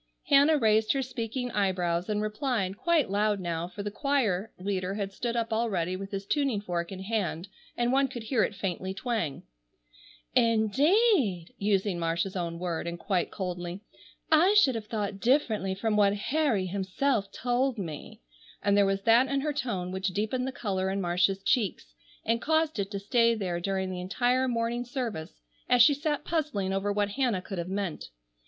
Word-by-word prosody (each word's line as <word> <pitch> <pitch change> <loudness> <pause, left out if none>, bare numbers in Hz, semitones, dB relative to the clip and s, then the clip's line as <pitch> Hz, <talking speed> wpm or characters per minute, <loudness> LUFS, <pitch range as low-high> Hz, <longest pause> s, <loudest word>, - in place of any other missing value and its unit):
Hannah 285 +3 +6
raised 220 -3 +3
her 270 -1 0
speaking 245 0 -4
eyebrows 185 -3 0
and 210 0 0
replied, 215 -3 -1
quite 320 - +1
loud 205 0 +1
now, 170 -2 -3
for 200 +3 -7
the 205 - -3
choir 225 -6 0
leader 185 0 -2
had 200 -2 -3
stood 240 +3 -3
up 230 -1 -1
already 190 -6 0
with 195 +1 -6
his 195 -1 -5
tuning 275 -4 +1
fork 175 -3 -3
in 190 -1 -6
hand, 190 -4 -2 0.3
and 240 0 +1
one 275 0 +3
could 240 -3 -7
hear 225 0 +1
it 205 - -2
faintly 190 0 -3
twang: 215 - -2 0.9
"Indeed!"—using 220 - +2
Marcia's 170 +3 -1
own 170 -2 -3
word—and 170 -1 -3
quite 180 -1 -1
coldly, 180 -1 -5 0.5
"I 350 +6 +5
should 290 -11 +6
have 220 -2 -5
thought 205 -3 -3
differently 220 -6 +1
from 215 +2 0
what 205 -1 +4
Harry 230 -2 0
himself 200 +4 -1
told 250 +1 0
me," 160 - -7 0.4
and 200 0 +3
there 200 -1 +4
was 195 0 -1
that 235 +4 +5
in 275 0 0
her 300 +1 -1
tone 195 -10 -3
which 190 +1 -2
deepened 220 +7 -1
the - - -2
color 190 -6 -2
in 195 +1 -1
Marcia's 185 +2 +1
cheeks 195 - 0 0.3
and 230 +1 +1
caused 315 -4 +1
it 195 -1 -1
to 200 - -4
stay 230 +3 +3
there 180 -5 -2
during 190 +1 -2
the 180 -1 -4
entire 245 +7 +1
morning 235 0 -1
service 235 - -5 0.3
as 245 -1 +7
she 290 - +6
sat 295 +1 -2
puzzling 285 - -1
over 195 +1 0
what 205 0 0
Hannah 240 -4 0
could 195 -3 -5
have 170 +1 -4
meant. 195 - -3
205 Hz, 175 wpm, -28 LUFS, 190-245 Hz, 0.9 s, as